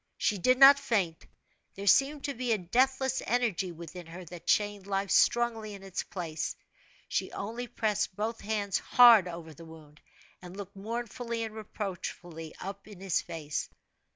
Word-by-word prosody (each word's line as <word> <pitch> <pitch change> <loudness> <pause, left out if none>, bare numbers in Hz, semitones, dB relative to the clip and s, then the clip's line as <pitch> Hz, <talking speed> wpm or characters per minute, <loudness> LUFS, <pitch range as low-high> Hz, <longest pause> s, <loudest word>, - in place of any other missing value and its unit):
She 205 -3 0
did 255 +8 +3
not 275 +1 +9
faint 200 -12 -1 0.5
there 195 - -6
seemed 275 +7 +4
to 280 - -2
be 250 -1 -2
a - - +2
deathless 260 +8 +1
energy 225 -7 0
within 170 +1 -9
her 175 +2 -9
that 170 0 -11
chained 205 -2 +1
life 195 0 -1
strongly 225 -3 +2
in 195 - -12
its 195 -2 -3
place 165 -4 -4 0.5
she - - -2
only 230 +5 -5
pressed 215 -5 -1
both 220 +3 -3
hands 205 -2 -1
hard 235 -6 +7
over 170 -2 -8
the 160 - -13
wound, 155 -2 -14 0.4
and 180 +1 -10
looked 200 0 -8
mournfully 230 +2 -4
and 220 -1 -5
reproachfully 180 -6 -6
up 195 +1 -7
in 205 -4 -12
his 190 -2 0
face. 150 -2 -5
200 Hz, 160 wpm, -30 LUFS, 175-235 Hz, 0.5 s, not